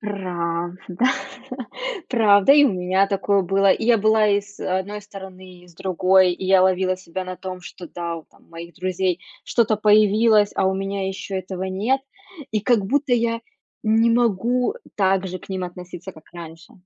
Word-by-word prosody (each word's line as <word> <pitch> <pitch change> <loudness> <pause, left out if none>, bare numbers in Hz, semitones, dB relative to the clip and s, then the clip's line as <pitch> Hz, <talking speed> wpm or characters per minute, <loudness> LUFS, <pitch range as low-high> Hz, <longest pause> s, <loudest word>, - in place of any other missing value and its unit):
правда 180 -1 -4 1.0
правда, 210 -1 +5
и 290 0 +7
у 255 - +2
меня 185 +2 +1
такое 200 0 +1
было, 195 +2 +2
и 220 - +1
я 235 -2 +4
была 215 +1 +3
и 200 0 +3
с 205 0 -17
а - - -5
с 185 0 0
одной 205 +2 -7
стороны, 190 -2 -12
и - - -19
с 170 - -19
другой, 185 +1 +3
и 180 - -7
я 190 -1 +5
ловила 185 0 +2
себя 185 0 -6
на 185 0 -6
том, 185 -1 -7
что 175 0 -10
да, 170 0 -5
вот 160 - -12
там - - -25
у - - -31
моих 170 +1 -10
друзей 185 -1 -1 0.2
что-то 225 -3 +1
появилось, 210 0 +4
а - - +1
у 190 - +1
меня 195 0 -3
ещё 195 0 -5
этого 185 0 -5
нет, 205 +8 0 0.5
и 215 - 0
как 220 -2 +2
будто 280 +2 0
я 230 -1 +1 0.4
не 225 +1 +3
могу, 240 - +1
э, - - -12 0.2
так 190 -1 +2
же 185 0 -5
к - - -16
ним 190 -1 -3
относиться, 180 +1 -9
как 160 -2 -16
раньше. 165 -1 -11
190 Hz, 190 wpm, -22 LUFS, 185-210 Hz, 1.0 s, и